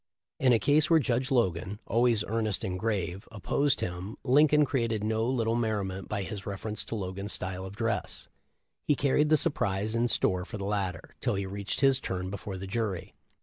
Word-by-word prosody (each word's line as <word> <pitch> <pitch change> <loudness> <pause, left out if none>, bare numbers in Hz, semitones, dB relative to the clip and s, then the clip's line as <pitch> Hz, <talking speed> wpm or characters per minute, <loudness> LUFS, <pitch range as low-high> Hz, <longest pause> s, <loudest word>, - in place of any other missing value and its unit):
In 130 -1 +4
a 120 - +6
case 145 +8 +3
where 165 -1 +6
Judge 125 -1 0
Logan 100 - +1
— - - -42
always 115 -2 +3
earnest 110 -2 -1
and 90 -1 -2
grave 95 -3 -2
— - - -40
opposed 135 +6 0
him, 90 +4 -4
Lincoln 150 +3 +5
created 115 -6 -1
no 110 +1 0
little 115 -3 +1
merriment 105 -5 -2
by 100 -2 -1
his 100 0 -6
reference 105 +2 -3
to - - -4
Logan's 100 0 -4
style 95 0 -4
of 95 - -10
dress. 115 -1 -2 0.6
He 150 - +2
carried 145 +2 +2
the 155 - +6
surprise 105 - 0
in 115 +1 +2
store 95 -5 +1
for 105 +4 -7
the 100 - -4
latter, 95 -4 -3
till 120 -5 +1
he 100 0 -2
reached 100 +4 -4
his 135 -1 +5
turn 95 -3 -3
before 100 -1 -5
the 95 - -6
jury. 100 -3 -3
105 Hz, 195 wpm, -29 LUFS, 95-120 Hz, 0.6 s, a